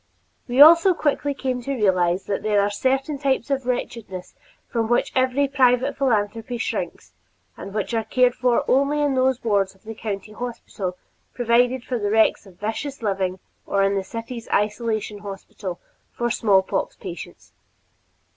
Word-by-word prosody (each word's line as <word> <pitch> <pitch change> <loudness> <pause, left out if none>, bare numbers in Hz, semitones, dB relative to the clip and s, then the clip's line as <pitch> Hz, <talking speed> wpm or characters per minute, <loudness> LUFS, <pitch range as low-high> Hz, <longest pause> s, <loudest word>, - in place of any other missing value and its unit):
We 245 +1 -1
also 335 +4 +8
quickly 290 -2 0
came 255 -2 -2
to 275 +3 -3
realize 185 -4 +2
that 200 - -2
there 210 -1 +2
are 200 +1 +1
certain 270 +6 0
types 270 -1 0
of 265 -2 -1
wretchedness 215 -7 -4 0.3
from 230 -2 -1
which 240 - +2
every 260 +2 +2
private 255 -2 +2
philanthropy 225 -2 0
shrinks 230 - -4 0.4
and 195 - -8
which 210 +3 -3
are 225 -1 +1
cared 245 +3 +3
for 245 -1 +1
only 280 +3 +2
in 290 -2 +2
those 260 -1 +1
wards 200 -4 +1
of 190 - -27
the 225 0 -7
county 210 -2 -5
hospital 210 -5 -5 0.4
provided 245 +1 +2
for 245 -2 -3
the 205 -1 -1
wrecks 220 -1 +3
of 180 -2 -17
vicious 230 +5 -4
living 190 -3 -1 0.3
or 200 0 +2
in 195 0 +2
the 195 -1 -1
city's 230 +3 -7
isolation 210 0 -1
hospital 195 -2 -7 0.3
for 240 0 -2
smallpox 195 -4 +1
patients. - - -9
230 Hz, 155 wpm, -23 LUFS, 205-260 Hz, 0.4 s, also